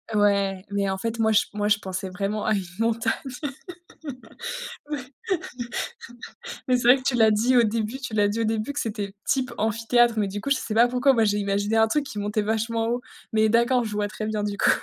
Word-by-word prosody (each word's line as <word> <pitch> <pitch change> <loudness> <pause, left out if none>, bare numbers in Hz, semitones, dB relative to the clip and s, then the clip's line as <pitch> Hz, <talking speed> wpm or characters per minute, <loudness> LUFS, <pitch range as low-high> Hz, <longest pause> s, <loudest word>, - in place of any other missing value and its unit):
Ouais, 200 -2 +2
mais, 200 -1 0
en 190 - -1
fait, 230 +3 -3
moi 220 0 +3
j 215 - +4
moi 205 0 -1
je 210 0 +4
pensais 190 -1 -5
vraiment 200 +3 -2
à 215 - +2
une 195 - -1 0.2
montagne. 225 0 +1 1.8
Ouais. 295 -2 -2 1.7
Mais 255 - +4
c'est 245 -1 +1
vrai 250 - +9
que 260 - -8
tu 265 - +2
l'as 220 -2 +5
dit 230 +5 +3
au 240 - +7
début 225 +2 -1
tu 260 -5 -5
l'as 205 -1 +4
dit 215 +3 -2
au - - +1
début 220 +4 -1
que 285 - -2
c'était 205 -3 -4
type 260 -2 0
amphithéâtre 230 +2 +2
mais 210 - +2
du 205 +2 -5
coup, 280 - -4
je 280 - +4
sais 220 - -4
pas 235 +2 +5
pourquoi, 250 +2 +3
moi 230 - +3
j'ai 205 -1 +1
imaginé 205 +2 0
un 225 0 +5
truc 295 +5 +1
qui 245 -7 -7
montait 210 +1 -1
vachement 225 +1 -1
haut, 240 +1 0 0.3
mais 220 0 +3
d'accord, 235 +2 +3
je 215 - -5
vois 205 0 -1
très 215 +1 -5
bien 215 -1 -1
du 205 -1 -2
coup. - - +5
220 Hz, 225 wpm, -25 LUFS, 205-235 Hz, 1.8 s, vrai